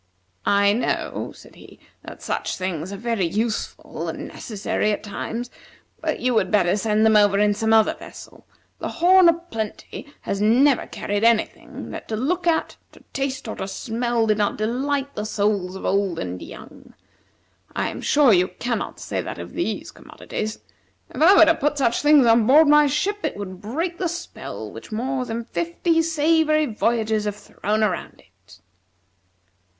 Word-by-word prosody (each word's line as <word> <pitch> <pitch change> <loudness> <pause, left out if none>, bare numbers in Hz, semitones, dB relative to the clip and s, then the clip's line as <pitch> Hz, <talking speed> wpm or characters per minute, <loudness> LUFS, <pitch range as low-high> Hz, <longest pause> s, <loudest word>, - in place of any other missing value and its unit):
"I 200 0 +4
know," 235 - -2
said - - -16
he, - - -16 0.2
"that - - -11
such - - -3
things 185 -1 -4
are 200 - -6
very 225 -4 -1
useful 215 +5 -3
and - - -6
necessary 215 0 -2
at 205 - -3
times, 230 +3 -5 0.5
but - - -2
you 250 0 +1
would 190 -5 +2
better 190 -3 +3
send 215 +1 +1
them 220 -1 +5
over 205 -1 +5
in 210 0 +3
some 220 +2 -1
other 220 -1 +5
vessel. - - -13 0.3
The - - -3
'Horn 360 +1 +5
o' - - +5
Plenty' 285 -3 -7
has 200 - -3
never 250 +5 +4
carried 205 +1 -3
any 230 -1 +5
thing - - -11
that - - -8
to 220 - -3
look 305 +11 -1
at, 325 -1 +1 0.2
to - - -18
taste, 270 -2 -3
or 220 - -4
to - - -4
smell, 235 +2 -1
did 215 -1 +1
not 205 - 0
delight 270 +5 -1
the 210 - -4
souls 200 -3 -1
of 190 - -7
old 195 -3 0
and 90 0 -5
young. - - -12 0.8
I - - 0
am - - -7
sure 285 -6 +4
you 180 0 +4
cannot 235 +2 -4
say - - -3
that - - -6
of - - -8
these - - -3
commodities. 215 0 -6 0.6
If - - -5
I 365 +5 +7
were 325 - +8
to 325 - +5
put 295 -1 -1
such 235 -4 +1
things 295 -3 +6
on 225 -1 +4
board 300 +4 +7
my 295 0 +6
ship, 380 +9 -1
it 305 - -2
would 185 -2 -7
break 330 - -3
the 355 - 0
spell 345 +1 -7
which - - -11
more 255 +4 -2
than 230 0 -4
fifty 175 - 0
savory 320 -1 +2
voyages 220 -2 0
have 205 -1 -2
thrown 210 +1 -2
around 190 -5 -2 0.3
it." 100 -3 -17
225 Hz, 175 wpm, -22 LUFS, 205-290 Hz, 0.8 s, were